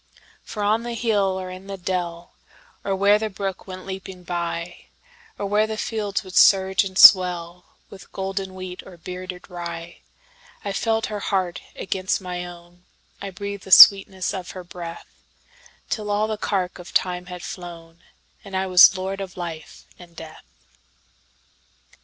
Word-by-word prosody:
For 210 - -6
on 215 +2 +2
the 240 0 -5
hill 205 -5 0
or 185 0 -6
in 185 +1 -10
the 195 0 -6
dell, 175 -2 -4 0.5
Or 195 - -1
where 200 +2 +4
the 220 0 -2
brook 195 -1 -5
went 185 0 -8
leaping 190 -1 -8
byOr 170 0 -4 0.6
where 210 +2 +1
the 220 0 -4
fields 215 -2 -2
would 185 -1 -11
surge 190 0 +5
and 190 -1 -6
swellWith 180 0 +4
golden 190 0 -4
wheat 185 -1 -7
or 185 -2 -13
bearded 180 +1 -8
rye,I 180 - -10
felt 225 +2 0
her 210 -1 -5
heart 185 -3 -2
against 190 -1 -2
my 180 -2 -5
own,I 175 +2 -12
breathed 200 +1 -7
the - - -11
sweetness 190 0 +8
of 185 -2 -6
her 185 - -7
breath, 170 -1 -9 0.9
Till 210 -2 -3
all 205 +1 +1
the 220 - -2
cark 190 -3 -2
of 175 - -12
time 180 -1 0
had 180 -1 -8
flown, 170 -2 -9 0.4
And 195 -2 -5
I 190 - 0
was 185 0 +7
lord 190 +1 -4
of 185 -2 -8
life 165 -3 -8
and 175 -2 -15
death. 160 -1 -11
185 Hz, 150 wpm, -23 LUFS, 180-200 Hz, 0.9 s, sweetness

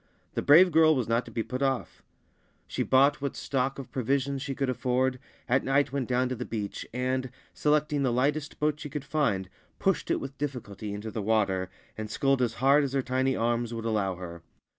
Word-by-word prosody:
The - - -1
brave 175 +6 +7
girl 160 0 +5
was 125 -5 -1
not 115 +1 +1
to - - -11
be 115 - -2
put 125 +3 -5
off. 135 -2 -1 0.6
She - - -3
bought 135 +2 +4
what 140 - -3
stock 135 0 -1
of 135 - -8
provisions 135 +2 0
she 140 -1 -4
could 135 0 -1
afford, 130 +1 0 0.3
at 130 +1 +2
night 135 +1 +2
went 135 -3 -2
down 125 0 +2
to 130 - -2
the 125 - -4
beach, 105 -4 -5
and, 130 +1 -1 0.2
selecting 150 -1 +1
the 130 -3 +2
lightest 145 +5 0
boat 150 0 +1
she 150 - -6
could 145 0 -5
find, 130 -12 0 0.3
pushed - - 0
it - - +1
with 135 0 -8
difficulty 115 -8 -5
into 105 +2 -5
the 110 - -3
water, 100 -3 +1 0.3
and 110 0 -4
sculled 135 +2 +1
as 115 -2 0
hard 140 +5 +4
as 135 -1 -2
her 135 -1 +1
tiny 130 +1 +1
arms 120 0 0
would 115 0 -5
allow 105 -4 0
her. 85 -2 -8
130 Hz, 205 wpm, -28 LUFS, 115-140 Hz, 0.6 s, brave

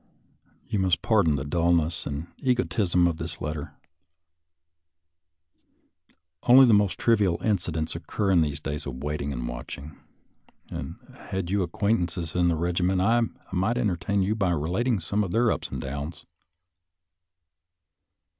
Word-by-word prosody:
You 105 - -1
must 95 -2 +1
pardon 100 -10 +3
the 65 - -2
dullness 85 +2 +1
and 75 +2 -4
egotism 110 -8 +1
of 85 -2 +1
this 80 -1 -6
letter. 75 -1 -5 2.7
Only 130 +2 +8
the 120 - +5
most 100 -2 +3
trivial 105 -7 +2
incidents 85 -7 -1
oc 85 - -8
cur 100 -2 0
in 90 -3 +5
these 75 -2 -1
days 75 -1 -5
of 65 0 -6
waiting 75 -1 -2
and - - -4
watching. 70 +5 -7 0.8
Had 95 -2 -6
you 100 0 +2
acquaintances 90 -2 -1
in 90 -1 +2
the 85 - +2
regiment, 90 +3 0
I 115 +5 +3 0.3
might 95 +6 0
en 120 -4 +2
tertain 95 +3 0
you 100 +3 +1
by 100 -4 0
relating 90 - 0
some 100 +5 0
of 95 - -3
their 115 +4 +2
ups - - -3
and - - -5
downs. 70 +4 -6
90 Hz, 140 wpm, -26 LUFS, 80-100 Hz, 2.7 s, Only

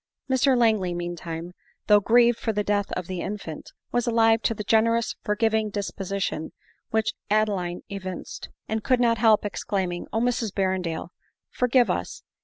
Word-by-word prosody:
Mr 260 0 +3
Langley, 215 -7 +2
mean 175 0 -3
time, 165 +1 -6 0.3
though 210 -1 +6
grieved 235 +3 +4
for 225 - -1
the 210 -1 -1
death 205 0 0
of 180 - -3
the 185 -1 -4
infant, 195 -6 -6 0.2
was 245 0 0
alive 225 -1 +4
to 225 - 0
the 210 - -5
generous 230 +2 +2
forgiving 220 +1 +1
disposi 200 -1 -4
tion 160 -4 -3 0.4
which 220 0 0 0.2
Adeline 200 -5 0
evinced; 185 -3 -7 0.2
and 220 -1 -2
could 255 -2 +2
not 230 -2 +3
help 220 -2 +4
ex 205 - -4
claiming, 185 -3 -2
" - - -39
Oh, 220 - 0
Mrs 240 -2 0
Berrendale! 185 -4 -1 0.4
forgive 250 0 +3
us - - -4
210 Hz, 170 wpm, -25 LUFS, 185-230 Hz, 0.4 s, though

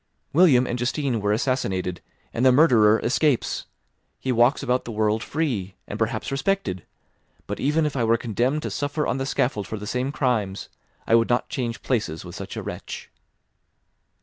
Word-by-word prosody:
William 145 -6 +6
and 120 0 -3
Justine 125 -1 -1
were 105 0 +1
assassinated, 95 -7 -1 0.3
and 115 - -1
the 130 - +7
murderer 115 -7 +5
escapes; 135 +1 +1 0.5
he 130 - -1
walks 120 +3 +3
about 125 +1 +1
the 120 - -6
world 110 0 +1
free, 120 - -2
and 105 - -6
perhaps 115 +1 -1
respected. 135 - -1 0.6
But - - -5
even 150 +3 +2
if 150 - -2
I 125 - +1
were 115 +1 +3
condemned 125 +6 -1
to - - -3
suffer 145 +1 -1
on 130 - -1
the 135 - -2
scaffold 110 -7 0
for 110 - -4
the 105 - -7
same 125 +5 -1
crimes, 110 -9 -1 0.4
I - - +1
would 115 0 +4
not 120 0 +1
change 120 -3 -3
places 105 -10 -1
with 90 - -9
such - - -7
a - - -4
wretch." - - -7
120 Hz, 175 wpm, -24 LUFS, 110-135 Hz, 0.6 s, the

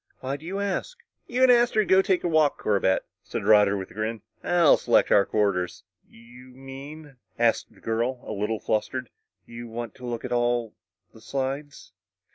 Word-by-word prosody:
"Why 135 +1 -3
do 155 +3 -10
you 195 +2 -3
ask?" 200 - -3 0.3
"You 250 +2 0
and 260 - +7
Astro 235 -3 +3
go 190 0 +5
take 190 -2 0
a - - +1
walk, 155 -3 +3
Corbett," 100 -2 +1 0.2
said - - -5
Roger 105 -2 +5
with 95 - -7
a - - -13
grin. 110 0 -4 0.2
"I'll 175 -3 +5
select - - +2
our 100 -1 +5
quarters!" 100 -4 -1 0.3
"You 120 +2 -16
mean," 135 +2 -10 0.2
asked 120 -1 +1
the - - -22
girl, 120 +3 -1
a - - -5
little 105 +1 -2
flustered, 115 +4 -2 0.3
"you 120 0 -9
want 115 0 -6
to 125 - -11
look 120 0 -4
at 125 - -6
all 120 -2 0 0.4
the 110 - -16
slides?" 135 +4 -5
125 Hz, 180 wpm, -25 LUFS, 110-150 Hz, 0.4 s, and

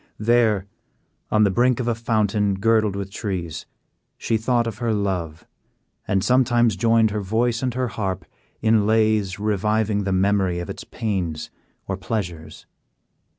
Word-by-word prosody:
There, 110 -3 +2 0.6
on 110 0 +3
the 100 - +3
brink 120 +4 +2
of 125 - -2
a 120 - +2
fountain 105 -3 0
girdled 110 0 +2
with 100 -1 -5
trees, 90 -7 -4 0.5
she 115 - -1
thought 120 +2 +1
of 110 -2 -5
her 120 -1 0
love, 90 -6 -3 0.6
and 95 -1 +1
sometimes 120 -3 +3
joined 115 -1 +3
her 105 0 -2
voice 115 +4 0
and 125 -2 -2
her 130 -1 -1
harp 95 -5 -3 0.4
in 110 -2 +3
lays 110 -3 +2
reviving 105 0 0
the 95 - -2
memory 95 -1 +2
of 85 -1 -4
its - - -8
pains 90 -8 -3 0.4
or - - -2
pleasures. 85 -8 -5
105 Hz, 150 wpm, -22 LUFS, 95-115 Hz, 0.6 s, on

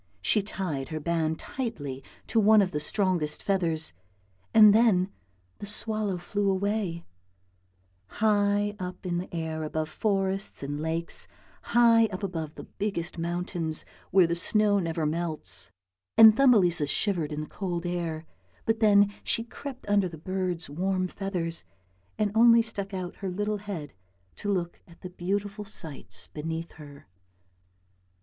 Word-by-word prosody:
She 210 - +3
tied 175 -9 -4
her 155 -1 -3
band 160 0 0
tightly 145 - -5 0.2
to 230 - +1
one 215 0 +6
of 185 - -2
the 150 - -2
strongest 170 -2 0
feathers, 165 - +1 0.6
and 215 -2 +8
then 205 -4 +4 0.5
the 205 - -7
swallow 215 -2 -1
flew 200 +3 -1
away, 195 -3 -1 1.0
high 205 -1 +1
up 180 0 -6
in 175 -1 -1
the 180 - -7
air 160 -2 -3
above 155 0 -2
forests 195 -3 -1
and 145 +1 -3
lakes, 165 +1 +1 0.3
high 230 -1 +5
up 185 -1 -7
above 160 -5 -4
the - - -8
biggest 175 -5 -4
mountains 170 -1 -1 0.2
where 185 -1 +5
the 170 - 0
snow 205 +4 +2
never 165 -3 -1
melts; 150 - -2 0.5
and 220 -1 +10
Thumbelisa 195 - +4
shivered 170 -2 0
in 150 0 -3
the - - -4
cold 175 -1 -4
air, 170 -2 -3 0.4
but 225 0 +1
then 205 -2 +5
she 230 - 0
crept 260 +2 -9
under 200 -2 +2
the 165 - -9
bird's 185 0 -2
warm 185 +5 -1
feathers, 180 -4 -2 0.5
and 210 -2 +1
only 230 +1 +6
stuck 205 -3 -5
out 185 -2 -5
her 195 - -4
little 205 +3 -1
head 195 - -6 0.4
to 205 - -2
look 175 -3 -2
at 170 -1 -18
the 180 - -8
beautiful 200 +3 -3
sights 165 -8 -6
beneath 160 +2 -5
her. 145 -2 -13
185 Hz, 145 wpm, -27 LUFS, 165-205 Hz, 1.0 s, and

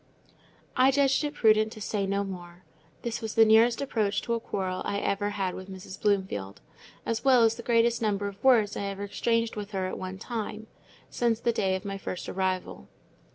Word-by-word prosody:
I 255 +1 +5
judged 275 +1 +3
it 295 0 -3
prudent 215 -3 +4
to 215 - -10
say 200 -1 -2
no 200 +1 0
more. 180 -2 -9 0.4
This 235 -1 -3
was 220 -1 -5
the 225 - +7
nearest 225 +3 +5
approach 210 -6 0
to 235 - -1
a 230 - 0
quarrel 190 -4 -3
I 200 - -2
ever 200 0 -1
had 195 -3 -2
with 185 +1 -8
Mrs. 190 0 -9
Bloomfield; 190 - -1 0.5
as 230 -1 -2
well 255 -3 +6
as 225 0 +4
the 235 - -8
greatest 235 0 +2
number 205 -2 0
of 200 -1 -9
words 235 -6 +4
I 200 - -3
ever 200 0 -4
exchanged 230 +2 0
with 210 0 -6
her 190 -1 -1
at 185 - -4
one 185 0 -5
time, 220 0 -5 0.5
since 235 -2 +1
the 235 0 +1
day 190 -4 +1
of 190 - -6
my 195 0 -4
first 185 - -5
arrival. 185 - -2
205 Hz, 200 wpm, -28 LUFS, 195-230 Hz, 0.5 s, the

